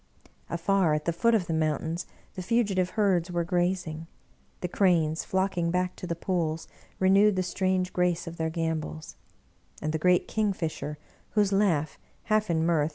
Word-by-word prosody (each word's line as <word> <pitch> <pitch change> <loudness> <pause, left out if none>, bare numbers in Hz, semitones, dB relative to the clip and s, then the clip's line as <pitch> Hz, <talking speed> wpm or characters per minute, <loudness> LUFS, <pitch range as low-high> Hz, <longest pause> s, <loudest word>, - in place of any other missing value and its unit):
Afar, 170 -1 +2
at 150 - -3
the 170 - +1
foot 230 +7 +3
of 200 -5 +1
the 165 - -2
moun 155 -1 +1
tains, 165 +2 -4 0.3
the 185 - -6
fugitive 195 -3 +1
herds 190 -4 +2
were 175 -1 0
grazing; 175 -2 -1 0.5
the 180 - -1
cranes, 170 -4 +2
flocking 190 -3 0
back 180 +1 0
to 180 - -6
the 170 - -2
pools, 165 -2 -2 0.3
renewed 195 +2 +4
the 185 - +1
strange 185 0 0
grace 180 -1 +1
of 170 0 -8
their 160 0 -1
gam 160 -1 -1
bols; 155 +1 -8 0.7
and 155 0 -2
the 160 - -1
great 180 +2 +3
kingfisher, 175 -8 -2 0.4
whose 205 -2 +3
laugh, 170 -7 +1 0.2
half 215 -1 +1
in 160 -1 +1
mirth 160 -3 +2
175 Hz, 170 wpm, -28 LUFS, 160-190 Hz, 0.7 s, renewed